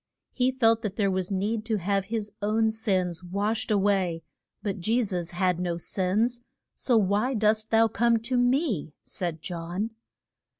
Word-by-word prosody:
He 255 0 +1
felt 230 -3 +3
that 210 -4 -3
there 200 -2 +1
was 185 -1 -1
need 210 +3 -1
to 220 -2 0
have 195 +1 0
his 215 -1 -3
own 220 +2 +2
sins 185 -6 -1
washed 205 +5 -2
a 210 - +3
way, 190 -4 +1 0.4
but 200 -2 -2
Je 225 +7 +1
sus 180 -5 -2
had 180 0 0
no 175 -2 -1
sins. 210 +8 0 0.3
So 245 -3 +1
why 210 +6 +1
dost 215 0 +2
thou 225 0 +5
come 230 +1 +2
to 245 +3 -2
me? 245 - +1
said 170 -3 -5
John. 175 +5 -3
205 Hz, 165 wpm, -27 LUFS, 185-225 Hz, 0.4 s, thou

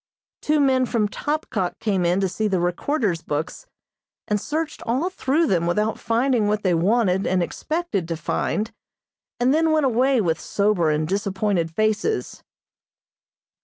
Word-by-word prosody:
Two 305 0 +2
men 260 -2 +3
from 225 -4 +1
Topkok 290 - -2
came 195 -5 0
in 175 +2 +2
to 190 - +2
see 215 +4 -1
the 190 -3 +1
Recorder's 175 - 0
books, 160 - -4 0.6
and 210 -1 0
searched 310 +1 -3
all 270 +11 -1
through 315 0 +1
them 170 - +1
without 210 +5 0
finding 235 -1 +1
what 210 0 0
they 185 -3 +2
wanted 190 +2 +2
and 185 -1 +2
expected 310 - -3
to 165 -1 -3
find, 210 +7 -2 0.7
and 250 +3 +3
then 320 +1 +3
went 310 -2 +3
away 260 +1 +3
with 165 -6 0
sober 200 -5 +1
and 155 0 0
disappointed 195 -2 0
faces. 215 - -1
210 Hz, 150 wpm, -23 LUFS, 180-265 Hz, 0.7 s, men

